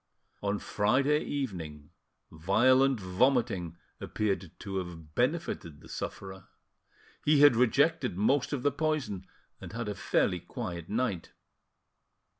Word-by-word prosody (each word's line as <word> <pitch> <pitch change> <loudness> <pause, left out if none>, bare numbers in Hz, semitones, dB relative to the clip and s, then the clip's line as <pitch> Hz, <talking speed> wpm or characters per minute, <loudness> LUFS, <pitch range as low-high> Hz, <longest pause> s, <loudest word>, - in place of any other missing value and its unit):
On 100 0 0
Friday 135 +10 +2
evening 80 - -5 0.4
violent 125 +10 +3
vomiting 95 - +1 0.2
appeared 100 -4 -2
to 95 -1 -5
have 85 -4 -7
benefited 125 - -1
the - - -15
sufferer. 95 -1 -7 0.8
He 150 -1 +4
had 145 -4 +8
rejected 125 - +2
most 125 +7 +2
of 140 -4 -2
the 145 - +3
poison, 145 - -2 0.3
and - - -9
had 115 -1 -4
a 105 - -2
fairly - - +1
quiet 85 -2 -6
night. 110 -6 -2
105 Hz, 115 wpm, -30 LUFS, 90-135 Hz, 0.8 s, had